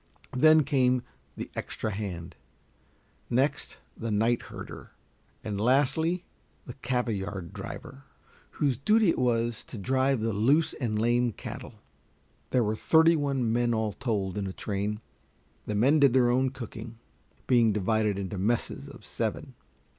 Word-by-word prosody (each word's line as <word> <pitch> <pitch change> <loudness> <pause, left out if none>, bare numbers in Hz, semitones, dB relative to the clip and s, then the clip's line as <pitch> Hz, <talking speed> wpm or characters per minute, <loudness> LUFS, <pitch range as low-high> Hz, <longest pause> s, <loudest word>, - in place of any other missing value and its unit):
Then 155 +3 +6
came 130 -3 +2 0.3
the - - -6
"extra 110 - -3
hand," 95 -5 -5 0.9
next 130 +4 0 0.2
the 115 - -4
night 115 +3 +2
herder, - - -9 0.5
and 105 -1 -3
lastly 145 +8 +2 0.4
the - - -7
cavayard 100 -8 -3
driver, 135 +1 -8 0.5
whose 140 -5 0
duty 210 - +3
it - - -3
was 120 -2 0
to 120 - -9
drive 130 +4 +1
the 115 0 0
loose 135 +11 +3
and 115 -5 -2
lame 120 +1 +2
cattle. - - -8 0.7
There 125 -2 +2
were 110 0 0
thirty 160 +7 +5
one 135 -6 0
men 120 0 +2
all 110 -2 -1
told 100 -4 -2
in 100 - -2
a 95 - -5
train. 105 +2 -3 0.7
The 105 - -2
men 135 +9 +4
did 140 -4 +5
their 125 -2 +4
own 130 +2 +2
cooking, 115 -3 -8 0.5
being 120 -3 +4
divided 105 0 +1
into 95 -1 -4
messes 115 +5 -1
of - - -13
seven. - - -3
120 Hz, 140 wpm, -28 LUFS, 105-130 Hz, 0.9 s, Then